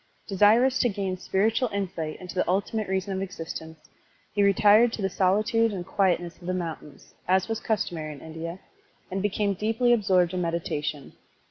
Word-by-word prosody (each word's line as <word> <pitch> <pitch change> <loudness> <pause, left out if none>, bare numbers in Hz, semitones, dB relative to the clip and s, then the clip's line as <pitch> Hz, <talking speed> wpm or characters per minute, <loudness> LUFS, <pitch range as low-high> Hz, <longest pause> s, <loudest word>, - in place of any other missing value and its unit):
Desirous 225 +6 +4
to 245 - +3
gain 195 -2 -2
spiritual 220 +6 0
insight 180 -6 -3
into 180 -1 -8
the 185 - 0
ultimate 200 +3 0
reason 190 +1 -1
of 190 - -2
existence, 165 -4 -6 0.6
he 205 - +1
retired 205 +4 +5
to 230 - -6
the 195 - 0
solitude 215 +5 +2
and 185 -3 -5
quietness 175 -3 0
of 175 - -10
the 185 - 0
mountains, 160 -5 -7
as 185 +1 +2
was 225 -1 -2
customary 170 -8 -2
in 145 - -11
India, 165 +2 -7 0.5
and 190 +1 -2
became 205 0 0
deeply 225 +5 +2
absorbed 185 -5 +2
in 180 - -1
meditation. 150 -4 -3
190 Hz, 165 wpm, -26 LUFS, 175-210 Hz, 0.6 s, retired